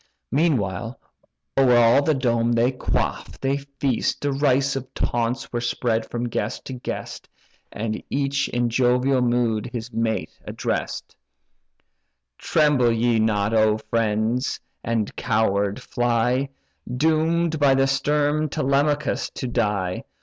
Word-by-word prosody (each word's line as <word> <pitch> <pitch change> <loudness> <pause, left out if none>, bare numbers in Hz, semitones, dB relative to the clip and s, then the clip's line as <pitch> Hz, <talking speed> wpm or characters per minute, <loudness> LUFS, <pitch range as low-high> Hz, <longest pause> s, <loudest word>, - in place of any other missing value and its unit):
Meantime, 120 - 0 0.6
o'er 125 -2 +5
all 120 +3 +5
the 155 +1 +1
dome, 120 -2 +1
they 120 +2 +3
quaff, 130 - -3
they 135 +1 0
feast, 140 -2 -2
Derisive 135 -2 0
taunts 120 +2 -2
were 120 - -1
spread 120 -1 -1
from 120 0 -2
guest 110 -2 -3
to 130 - -6
guest, 125 - -6 0.4
And 110 0 -3
each 140 0 0
in 120 -1 0
jovial 125 +2 +2
mood 120 -3 +1
his 120 0 -6
mate 115 -1 -1
address'd: - - -4 1.2
"Tremble 145 -6 +3
ye 115 0 +2
not, 105 -1 +1
O 110 -1 +4
friends, 115 +3 -1 0.2
and 115 -3 -1
coward 100 -3 0
fly, 120 +2 0 0.5
Doom'd 160 +2 +1
by 140 -2 +5
the 135 0 +3
stern 145 +2 +1
Telemachus 145 +1 0
to 130 - -3
die? 100 -6 -1
125 Hz, 120 wpm, -23 LUFS, 115-140 Hz, 1.2 s, o'er